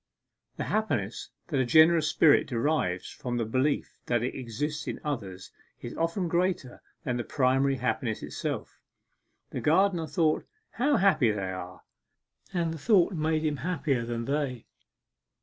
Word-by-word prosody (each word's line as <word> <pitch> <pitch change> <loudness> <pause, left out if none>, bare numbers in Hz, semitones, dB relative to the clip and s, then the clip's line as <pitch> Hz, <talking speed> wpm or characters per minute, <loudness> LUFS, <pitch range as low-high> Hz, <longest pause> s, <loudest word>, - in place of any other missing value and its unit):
The - - -2
happiness 120 - -1 0.2
that 145 -5 0
a - - +4
generous 160 +3 +5
spirit 150 -3 +5
derives 115 - -1
from 120 -1 -4
the 115 - 0
belief 130 +6 -1
that 120 -1 +1
it 125 - -2
exists 145 +5 -4
in - - -4
others 100 -11 -5 0.3
is 120 - -7
often 165 +2 -1
greater 170 -6 -1 0.2
than 125 -1 -1
the 120 - -2
primary 135 +2 +2
happiness 125 -3 -2
itself. - - -5 0.7
The - - -4
gardener 170 +1 +3
thought 160 -2 +1 0.2
'How 280 +4 +2
happy 160 - +4
they 100 -3 -2
are!' 90 -1 -8 0.7
and 170 -3 -1
the 160 - -7
thought 200 0 +4
made 155 -1 0
him 150 -2 0
happier 145 -7 -1
than 115 0 -3
they. 135 -3 -2
145 Hz, 150 wpm, -28 LUFS, 120-165 Hz, 0.7 s, generous